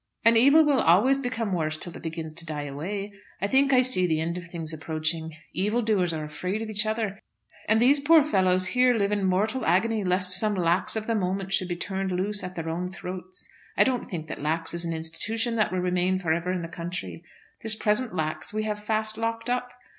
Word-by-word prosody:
"An 230 0 +6
evil 280 +7 +6
will 285 -3 +3
always 215 +12 +4
become 230 -6 -2
worse 155 -3 0
till 175 +2 -3
it - - -9
begins 160 -1 -5
to 170 +1 -2
die 155 -3 -4
away. 195 +9 -5 0.3
I - - -1
think 270 +6 +3
I 255 -1 +5
see 185 -8 +3
the 160 -2 0
end 165 +2 -2
of 175 -1 -7
things 165 -2 -5
approaching. 160 +1 -2 0.2
Evil 210 +6 0
doers 195 -6 +1
are 155 -1 -3
afraid 185 +8 -4
of 220 - -6
each 215 +1 0
other, 215 -3 -2 0.5
and 220 +1 +4
these 270 +5 +5
poor 310 +2 +6
fellows 185 -8 +2
here 250 +3 +3
live 200 -2 +1
in 205 -1 0
mortal 210 +7 +1
agony 215 +4 +1
lest 180 0 +2
some 210 +3 +5
Lax 175 +2 +1
of 220 -1 -3
the 230 - 0
moment 195 -1 -2
should 185 - +1
be 175 - -3
turned 190 +1 -3
loose 200 +3 -1
at 185 0 -6
their 165 -1 -5
own 175 +3 -3
throats. 185 0 -7 0.3
I - - +7
don't 255 -2 -1
think 160 -5 -6
that - - -7
Lax 160 +3 0
is 170 0 -1
an 165 - -2
institution 220 +9 -2
that 215 - +1
will 185 -1 -1
remain 180 +1 +1
for 170 -4 0
ever 170 +2 -2
in 180 -2 -2
the - - -4
country. 170 0 -6 0.4
This 220 -1 +1
present 220 +3 +1
Lax 155 -1 -3
we 215 0 -2
have 210 -1 -4
fast 215 0 -1
locked 230 +1 -2
up. 250 0 -1
190 Hz, 225 wpm, -26 LUFS, 170-220 Hz, 0.5 s, I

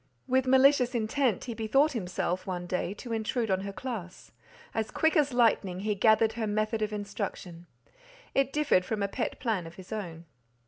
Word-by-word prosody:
With 260 0 +2
malicious 265 -1 +5
intent 235 -1 0
he 240 - -5
bethought 270 +7 +2
himself, 185 -5 -2
one 180 -1 -3
day, 180 +2 -2
to 235 +2 -6
intrude 225 0 -1
on 190 0 +1
her 200 0 -5
class; 200 -6 -7 0.4
as 220 -1 -1
quick 320 +2 +1
as 290 -3 +3
lightning 210 -6 +2
he 210 +1 0
gathered 220 +2 +4
her 225 -1 -2
method 215 +1 -1
of 215 0 -1
instruction; 200 -4 -5 0.7
it 275 -1 +2
differed 295 -11 +2
from 210 +1 -2
a - - +1
pet 235 +4 -3
plan 215 -9 -1
of 165 - -12
his 190 +1 -13
own. 170 -6 -6
220 Hz, 180 wpm, -29 LUFS, 190-250 Hz, 0.7 s, malicious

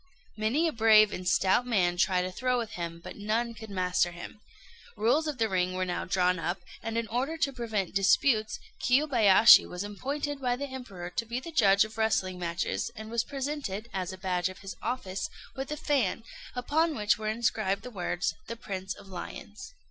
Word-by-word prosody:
Many 230 +10 +1
a - - 0
brave 215 -3 +5
and 180 0 -5
stout 190 +5 +3
man 180 -7 +2
tried 180 0 +2
a 185 - -4
throw 250 +5 0
with 230 -3 -3
him, 170 -2 -5
but - - -9
none 225 +3 -1
could 220 -1 -10
master 180 -2 +1
him. 175 +4 -10 0.6
Rules 285 +8 +2
of 300 -3 -3
the 225 -2 +2
ring 185 -2 0
were 185 0 0
now 180 - -3
drawn 180 -1 +1
up; 175 +2 -2 0.2
and 225 +1 -3
in 230 -1 -1
order 265 +8 -1
to 280 -3 0
prevent 220 -7 -2
disputes, 215 +4 +3 0.2
Kiyobayashi 240 -6 +6
was 180 +2 -5
appointed 275 +7 -4
by 245 -1 +1
the 280 +3 -4
Emperor 220 -10 -7
to 230 - -1
be 240 +2 -2
the 335 +6 -8
judge 205 -8 +5
of 220 +1 -10
wrestling 190 -4 +1
matches, 170 +4 -2
and 220 0 -8
was 230 -1 +1
presented, 270 -7 -4
as 185 -1 -2
a 190 - -8
badge 180 -1 -1
of 185 - -10
his 195 -1 -7
office, 195 -7 -3 0.3
with 270 +1 -5
a 300 - -2
fan, 265 -9 0 0.3
upon 310 +6 +1
which 210 -1 +1
were 215 - -4
inscribed 215 -3 0
the 250 - -8
words 180 -3 -2
the 230 - -4
"Prince 190 -4 -5
of 195 - -14
Lions." 200 - -8
215 Hz, 195 wpm, -29 LUFS, 185-245 Hz, 0.6 s, Kiyobayashi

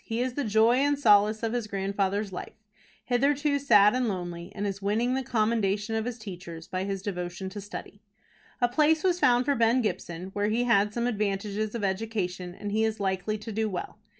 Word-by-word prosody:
He 225 +1 -3
is 250 0 -1
the 285 - -2
joy 220 +2 +4
and 285 +1 +2
solace 215 -3 +4
of 225 0 -1
his 240 -3 -2
grandfather's 200 0 -1
life, 180 - -8 0.5
hitherto 285 +3 +2
sad 210 -7 +6
and 250 -1 +1
lonely, 175 -2 -4
and 205 0 -3
is 200 0 -3
winning 220 +5 +1
the 265 - 0
commendation 220 -3 0
of 220 0 -1
his 245 -1 -4
teachers 180 -6 -9
by 185 +1 -3
his 195 -1 -4
devotion 180 -1 -4
to 205 +2 -7
study. 205 +1 -9 0.6
A 245 - +5
place 305 +5 +2
was 360 -2 +2
found 245 -5 +4
for 285 - +2
Ben 235 0 +3
Gibson, 180 -2 -4
where 205 +1 0
he 230 +3 +1
had 210 -4 +3
some 235 +2 -2
advantages 210 -1 -1
of 230 - -3
education, 190 -3 -2
and 205 +1 -5
he 220 +2 +1
is 220 0 -1
likely 190 +2 -1
to 215 +1 -8
do 220 +1 -1
well. 190 +2 -6
215 Hz, 205 wpm, -27 LUFS, 195-240 Hz, 0.6 s, sad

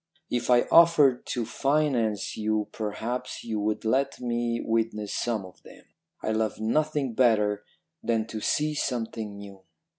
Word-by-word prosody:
If 120 0 -1
I 120 -1 +6
offered 155 -7 +6
to 120 -2 -2
finance 130 -6 0
you 110 0 -1
perhaps 115 +4 -4
you 110 -2 -3
would 105 +1 -1
let 135 +5 +1
me 120 -1 -1
witness 110 -3 -1
some 110 -5 -1
of 90 - -15
them. - - -16 0.4
I 110 - 0
love 110 -1 -1
nothing 145 +3 0
better 105 -4 +2 0.4
than 115 -2 0
to 110 - -5
see 150 +6 +1
something 115 -7 -3
new.' 100 -1 -11
115 Hz, 145 wpm, -27 LUFS, 110-125 Hz, 0.4 s, I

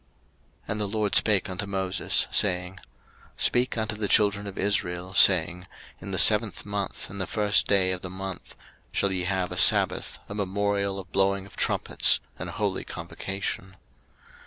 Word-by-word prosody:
03:023:023 - - -30
And 105 - -3
the 105 - 0
LORD 105 0 -2
spake 105 -3 +3
unto 90 +2 -5
Moses, 95 -1 0
saying, 90 -1 0 0.6
03:023:024 - - -8
Speak 125 0 +1
unto 110 -1 -3
the 105 -1 -2
children 100 0 +2
of 100 - -9
Israel, 95 -2 -2
saying, 90 -1 +4 0.3
In - - -9
the 95 - -3
seventh 105 0 +5
month, 100 -1 -4
in 100 - -8
the 95 - -2
first 105 -2 +1
day 95 -2 +2
of 90 -1 -4
the 95 - -7
month, 95 0 -8 0.4
shall 100 - -1
ye 90 -1 -2
have 95 -1 -2
a - - -5
sabbath, - - +4
a - - -8
memorial 100 0 -2
of 95 -2 -10
blowing 95 0 0
of 100 - -15
trumpets, - - +2 0.2
an - - -6
holy - - -3
convocation. 95 -1 -6
95 Hz, 170 wpm, -25 LUFS, 95-105 Hz, 0.6 s, seventh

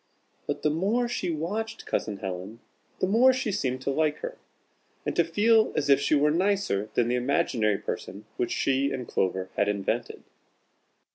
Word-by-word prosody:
But - - -3
the 150 - +3
more 205 +10 +1
she 190 -6 -2
watched 205 +8 -3
Cousin 105 -2 -2
Helen 95 +3 -6 0.4
the - - +2
more 230 +7 +5
she 260 -4 -1
seemed 130 -9 -2
to 140 - 0
like 155 +1 +1
her, - - -7 0.7
and - - -2
to 170 - +4
feel 215 +7 +3
as 145 -1 +1
if 140 0 +5
she 145 - +2
were 150 +1 +3
nicer 180 - +1
than 120 - +3
the 120 - 0
imaginary 125 -4 +1
person 100 +2 -6
which 120 - -1
she 135 +1 +1
and 125 -3 -4
Clover 95 0 -1
had 100 - +2
invented. 100 -1 -2
145 Hz, 170 wpm, -27 LUFS, -, 0.7 s, more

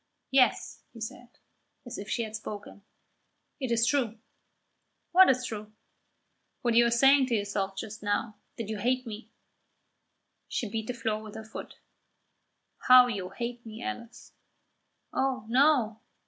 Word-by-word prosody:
"Yes," 265 -2 +2
he 230 - -11
said, 240 +2 -8 0.5
as 245 - -6
if 200 - -7
she 235 - 0
had 220 -1 -6
spoken, 205 -1 -8 0.8
"it 260 -4 -3
is 230 0 +3
true." 235 -4 +1 0.9
"What 370 +1 +8
is 255 -1 +2
true?" 215 -2 -6 0.9
"What 240 -1 +2
you 235 +1 +6
are - - +2
saying 270 +3 +5
to 240 - +1
yourself 200 -2 -2
just 220 0 -6
now 210 +2 -1 0.2
that 230 - -4
you 215 -1 -4
hate 255 +4 0
me." 220 0 -8 1.2
She 235 - -2
beat 220 +1 -4
the 250 - -3
floor 220 -2 -2
with 215 -1 -10
her 220 - -6
foot. 220 - -9 1.0
"How 255 0 +8
you 200 -7 -3
hate 235 +4 -5
me, 225 +1 -9
Alice!" 235 -2 -7 0.8
"Oh, 265 -4 0
no." 245 -3 +3
230 Hz, 145 wpm, -29 LUFS, 215-250 Hz, 1.2 s, What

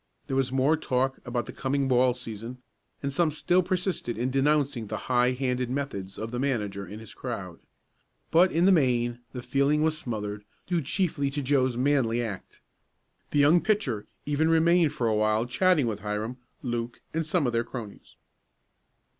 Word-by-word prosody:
There 135 - -3
was 135 -1 +1
more 135 +4 +3
talk 130 -3 -1
about 120 -1 -2
the - - -7
coming 135 0 -1
ball 125 -1 +3
season, 115 0 -7 0.5
and 140 0 -1
some 165 +2 +3
still 175 +4 +2
persisted 180 - -2
in 125 +3 -1
denouncing 135 -4 +1
the 110 - -3
high 125 0 +3
handed 125 -1 -1
methods 125 -9 -4
of 110 +1 -5
the 125 - -3
manager 105 -8 -1
and 100 +3 -8
his 110 - -10
crowd. 95 -9 -6 0.7
But 180 +3 +5
in 170 +2 +2
the 195 - +6
main 120 -7 +2
the 125 -2 -7
feeling 140 +3 +2
was 160 0 +2
smothered, 105 -7 -4 0.2
due 175 -2 0
chiefly 155 -2 0
to 145 +1 -3
Joe's 130 -2 +2
manly 125 -3 +2
act. 105 -6 -6 0.7
The - - -1
young 150 +4 +5
pitcher 145 - 0 0.2
even 150 +2 +1
remained 165 -1 +4
for 150 -6 -2
a 110 - +2
while 110 +1 +2
chatting 160 +3 +3
with 110 -3 -2
Hiram, 105 +4 -3 0.3
Luke 120 -1 -3
and 165 +1 0
some 160 0 +1
of 120 - 0
their 115 0 +2
cronies. 115 -4 -9
130 Hz, 175 wpm, -27 LUFS, 115-150 Hz, 0.7 s, the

